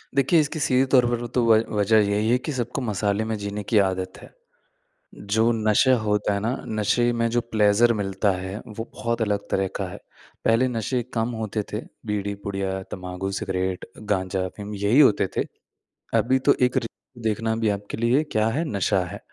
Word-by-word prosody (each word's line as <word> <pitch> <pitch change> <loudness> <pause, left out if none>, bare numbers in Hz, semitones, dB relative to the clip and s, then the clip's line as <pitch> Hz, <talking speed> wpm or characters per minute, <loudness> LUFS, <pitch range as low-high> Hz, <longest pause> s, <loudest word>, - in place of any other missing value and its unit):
देखिए, 140 +5 +4
इसकी 155 +1 -1
सीधे 130 -2 +3
तौर 125 -2 +6
पर 120 0 -2
तो 125 - +2
व 115 -1 +6 0.2
वज़ह 105 +2 +4
यही 105 +2 +1
है 125 - +4
कि 130 +5 -5
सबको 125 +2 -3
मसाले 105 -2 0
में 110 0 -2
जीने 100 0 -4
की 110 - +1
आदत 95 -1 -1
है। - - -12 1.0
जो 110 +3 +3
नशा 110 +4 +3
होता 105 -1 +1
है 100 - 0
ना, 110 +4 -1 0.2
नशे 110 +3 +1
में 115 0 +1
जो 120 +1 +1
प्लेज़र 110 0 +3
मिलता 100 -1 0
है, 95 +1 -4
वो 110 +1 -6
बहुत 115 0 -2
अलग 105 -2 +1
तरह 95 0 +1
का - - -2
है। - - -8 0.5
पहले 115 +3 +4
नशे 125 +1 -1
कम 115 0 0
होते 110 0 -2
थे 105 - -2 0.2
बीड़ी 100 -1 -2
पुड़िया 95 -1 -2 0.2
तम्बाकू, 90 +1 -4
सिगरेट, 95 -1 -2
गाँजा 95 -3 -1
अफ़ीम 105 +3 -7
यही 100 +7 +3
होते 110 -9 +5
थे। - - +1 0.7
अभी 125 +4 +2
तो 140 - +7
एक 125 0 +3
री 115 - 0 0.4
देखना 110 +1 0
भी 110 -1 +1
आपके 100 0 -3
लिए 120 +6 +2
क्या 110 0 +2
है, 140 +8 -1
नशा 100 -1 +2
है। 100 +4 -8
110 Hz, 190 wpm, -24 LUFS, 100-120 Hz, 1.0 s, तो